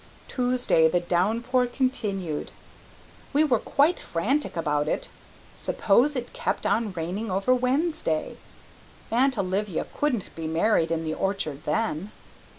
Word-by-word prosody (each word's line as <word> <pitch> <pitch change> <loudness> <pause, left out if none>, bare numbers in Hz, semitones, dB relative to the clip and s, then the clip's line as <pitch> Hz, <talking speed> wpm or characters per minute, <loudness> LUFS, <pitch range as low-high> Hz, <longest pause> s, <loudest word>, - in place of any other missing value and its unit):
Tuesday 245 -10 +2
the 175 +2 +2
downpour 225 +9 +1
continued. 205 - -2 0.8
We 295 +2 +5
were 255 -7 +3
quite 300 +5 +2
frantic 235 - -1
about 150 -2 0
it. - - -2 0.5
Suppose 245 +8 +2
it 245 -2 -4
kept - - -2
on 215 +1 +1
raining 185 +6 -3
over 195 +7 +2
Wednesday! 255 - 0 0.7
Aunt 260 +2 +3
Olivia 195 -1 -1
couldn't 260 -9 -1
be 160 -1 -4
married 165 +1 +2
in 165 -1 -1
the 155 -1 -2
orchard 195 -7 -2
then. 210 -3 -1
210 Hz, 125 wpm, -26 LUFS, 170-255 Hz, 0.8 s, We